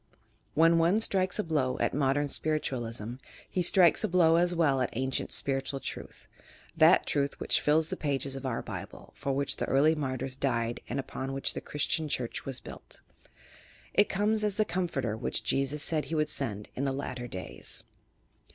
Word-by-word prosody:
When 165 +1 +5
one 170 +4 +4
striltes 190 -4 +1
a 210 - +1
blow 145 -7 0
at - - 0
Mod 135 -1 +2
ern 145 0 +1
Spiritualism, 120 -7 -2 0.3
he 185 - -1
strilies 175 +2 +5
a - - +2
blow 170 -3 +4
as 175 +1 +2
well 145 -6 +3
at 125 - +1
ancient 130 +2 -1
spiritual 135 0 -1
truth - - -8 0.2
— - - -25
that 165 +3 +7
Truth 140 -1 -1
which - - +2
fills 155 +2 +3
the - - -2
pages 140 -2 -2
of 135 - -6
our 130 -4 -2
Bible, - - -8
for 140 - -2
which 140 +1 0
the - - -1
early 145 +4 +4
martyrs 130 -3 -3
died 120 -3 -1
and 135 - -2
upon 135 0 -4
which 135 - -1
the - - -5
Christian 150 +1 -1
Church 125 -4 -3
was 135 -2 -3
built. - - -9 0.9
It 205 - +4
comes 210 +2 +1
as 210 -2 +1
the 215 - +2
Com 185 -2 -1
forter 115 -9 -2
which 110 - -1
Jesus 135 +2 0
said 155 -2 0
he 165 - -3
would 155 -1 +1
send 105 -9 -2
in 135 - -3
the 135 - +1
"latter 130 -2 -4
days. 95 -5 -6
140 Hz, 190 wpm, -30 LUFS, 130-165 Hz, 0.9 s, that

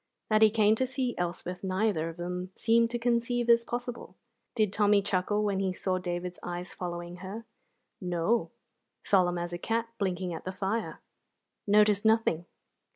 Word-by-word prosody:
That 215 0 +4
he 220 - +8
came 215 -1 +4
to 260 - +1
see 255 -1 -2
Elspeth 180 +1 -3
neither 185 -3 0
of 165 - -10
them 180 +1 -4
seemed 230 0 +3
to 240 - -2
conceive 240 0 0
as 235 0 +5
possible. 240 0 -5 0.4
Did 215 -4 +1
Tommy 205 -1 +4
chuckle 200 +2 0
when 200 -2 0
he 190 -1 0
saw 185 0 -1
David's 180 0 -4
eyes 175 +1 -5
following 175 0 -5
her? 195 +5 -7 0.6
No; 180 +5 0 0.5
solemn 180 -3 +3
as 175 0 -4
a 175 - -4
cat 230 +4 -1
blinking 185 -2 -1
at 160 - -6
the 185 - -4
fire; 200 +4 -3 0.7
noticed 210 0 +4
nothing. 220 -7 +2
195 Hz, 160 wpm, -29 LUFS, 180-225 Hz, 0.7 s, he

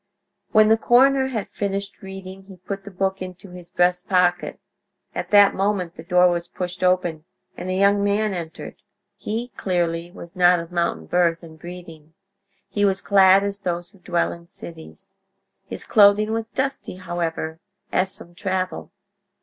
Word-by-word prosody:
When 215 0 +5
the 220 - +5
coroner 265 +3 +4
had 225 -6 -3
finished 200 0 -4
reading 190 0 -9
he 190 -1 -13
put 195 +2 -7
the - - -7
book 190 0 -2
into 185 0 -8
his 180 -1 -12
breast 180 0 +1
pocket. 180 -2 +1 0.5
At - - -4
that 205 -1 +6
moment 195 -3 -1
the - - -10
door 180 +1 +4
was 175 0 -2
pushed 180 0 -5
open 180 -4 +1 0.3
and 185 - -6
a 185 - -1
young 200 +1 +3
man 205 +1 +1
entered. 165 -3 -7 0.3
He, 230 +3 -4
clearly, 170 -2 -1
was 170 0 -12
not 180 -1 +5
of 170 +1 -8
mountain 170 - -1
birth 170 - +1
and 160 -1 -13
breeding: 165 -3 -11 0.5
he 205 - -2
was 195 -1 +2
clad 195 -1 +5
as 200 0 -3
those 175 -2 -3
who 195 - -22
dwell 175 -1 0
in 170 0 -13
cities. 160 - -12 0.5
His - - -7
clothing 210 0 +5
was 225 0 -3
dusty, 270 -5 -3
however, 170 -3 -4 0.3
as 190 +1 0
from 175 - -14
travel. 185 -1 -3
185 Hz, 165 wpm, -22 LUFS, 175-200 Hz, 0.5 s, that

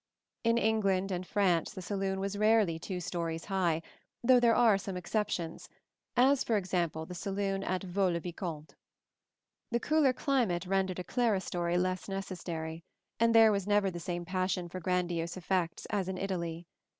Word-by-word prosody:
In 230 0 +3
England 200 -4 +1
and 180 0 -3
France 185 -6 +1
the 185 - -7
saloon 195 0 -2
was 195 +1 -2
rarely 210 -5 +3
two 180 +2 -4
stories 170 -2 -3
high, 175 -5 0 0.4
though 250 +1 +6
there 235 -1 +4
are 225 -5 +5
some 190 -1 -5
exceptions, 180 -3 -3 0.5
as 265 +2 +5
for 225 - +1
example 175 -4 -1
the 180 - -8
saloon 195 +1 -2
at 185 +1 -2
Vaux 190 0 +1
le 170 - -1
Vicomte. 170 -3 -6 1.0
The 235 - +1
cooler 300 0 +3
climate 245 - 0
rendered 190 -1 0
a 180 - -3
clerestory 185 -7 0
less 185 +1 -1
necessary, 170 -4 -5 0.4
and 230 0 +4
there 225 -1 +8
was 200 -2 -1
never 205 -2 +3
the 175 - -6
same 175 0 -4
passion 185 0 -1
for 185 - -6
grandiose 175 -1 -1
effects 180 -2 -1
as 195 -3 0
in 190 - -3
Italy. 175 -3 -3
185 Hz, 160 wpm, -31 LUFS, 175-205 Hz, 1.0 s, there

